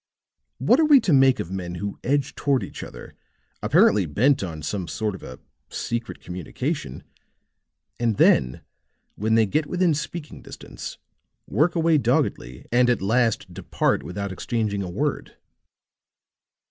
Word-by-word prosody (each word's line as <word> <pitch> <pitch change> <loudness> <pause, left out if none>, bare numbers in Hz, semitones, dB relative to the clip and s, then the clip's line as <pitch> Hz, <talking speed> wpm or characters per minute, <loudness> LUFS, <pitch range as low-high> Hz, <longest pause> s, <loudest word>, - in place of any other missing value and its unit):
What 250 - +3
are 320 - +5
we 295 -3 +7
to 175 - +1
make 135 -2 +5
of 85 - -4
men 90 -2 -4
who 100 +3 -5
edge 140 +1 0
toward 140 -3 0
each - - -8
other, - - -10 0.5
apparently 100 -4 +4
bent 130 - +2
upon 80 -5 -5
some 95 +2 -3
sort 105 +4 -2
of 95 - -9
a 65 - -9 0.3
secret 120 0 -4
communication 90 - -5 1.0
and 115 -3 0
then 65 0 +3 0.5
when 110 +2 0
they 115 -1 +5
get 150 +9 -1
within 180 -1 +2
speaking 155 +1 -6
distance, - - -9 0.5
work 170 +4 +1
away 165 -2 +3
doggedly 65 - -1
and 125 +1 +4
at 125 - +2
last 115 +3 0
depart - - 0
without 100 +2 -5
exchanging 105 +1 -2
a 95 - -4
word?" 140 +11 -3
115 Hz, 145 wpm, -24 LUFS, 95-145 Hz, 1.0 s, we